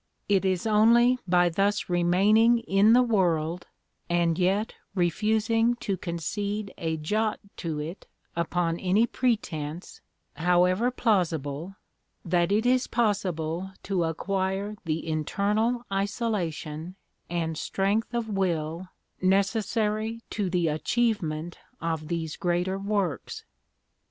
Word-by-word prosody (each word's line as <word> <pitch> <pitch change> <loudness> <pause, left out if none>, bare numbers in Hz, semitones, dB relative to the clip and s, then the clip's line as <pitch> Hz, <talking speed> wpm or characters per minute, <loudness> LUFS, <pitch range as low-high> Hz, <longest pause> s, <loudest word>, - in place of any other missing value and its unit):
It 195 -2 +3
is 185 0 0
only 235 +4 +5
by 175 0 +4
thus 200 +4 0
remaining 195 +7 +4
in 205 +2 +4
the 250 +1 +6
world, 175 -7 0 0.4
and 170 -1 +1
yet 195 +4 +1 0.2
refusing 220 +6 +2
to 205 -4 -2
concede 200 +4 -3
a 160 -1 -1
jot 210 +8 -1 0.2
to 160 -3 -3
it 160 +5 -6 0.3
upon 170 0 0
any 195 +5 +3
pretence, 180 - -2 0.3
however 180 +7 +3
plausible, 170 - -1 0.5
that 175 +1 +1
it 215 +3 +2
is 255 +1 +3
possible 190 -5 -1
to 185 -4 0
acquire 190 +4 -2
the 160 0 -2
internal 210 +10 0
isolation 185 -6 -2 0.3
and 165 -2 -2
strength 200 +7 -1
of 235 -2 -1
will 175 -3 -2 0.3
necessary 215 +3 0
to 205 -4 -1
the 175 -2 +1
achievement 165 -2 -1 0.2
of 160 -2 -3
'these 165 -2 -3
greater 180 +2 0
works.' 195 - -2
190 Hz, 110 wpm, -27 LUFS, 170-215 Hz, 0.5 s, the